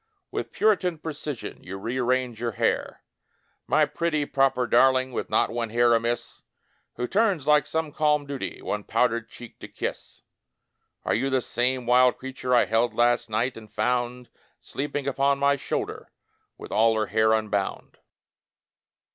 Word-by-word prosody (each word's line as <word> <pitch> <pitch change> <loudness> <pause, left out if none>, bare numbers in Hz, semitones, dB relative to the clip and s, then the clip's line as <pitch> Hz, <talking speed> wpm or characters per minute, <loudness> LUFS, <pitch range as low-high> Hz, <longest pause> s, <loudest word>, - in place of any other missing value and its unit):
With - - -4
puritan 185 -6 +1
precision 150 -4 -6
You 95 +1 -7
rearrange 125 +1 -1
your 120 -2 -2
hair.... - - -1 0.6
My - - +4
pretty, 155 -3 -1
proper 135 -3 +1
darling, 130 +2 +3
With - - -4
not - - +2
one 115 -1 -2
hair 120 +1 +3
amiss, 115 +1 -1 0.5
Who 125 - -3
turns, 195 - +1
like 150 -1 +4
some 160 -1 -2
calm 150 -1 +1
duty. 140 -2 -6
One 105 0 -3
powdered 115 0 0
cheek 120 - -12
to - - -8
kiss. - - -6 0.8
Are - - +1
you 135 +4 0
the 130 -1 +2
same 125 +1 0
wUd 125 +1 +4
creature 130 -1 -2
I 120 - +5
held 115 0 +1
last 120 0 +2
night, 115 +4 0
and 110 -2 -12
found 125 +2 -1 0.3
Sleeping 145 0 -4
upon 140 0 +1
my 140 0 +3
shoulder 140 - -4 0.5
With - - -10
all 110 +1 +3
her 110 -1 +1
hair 110 +1 +2
unbound? 105 -3 -2
125 Hz, 150 wpm, -25 LUFS, 115-140 Hz, 0.8 s, I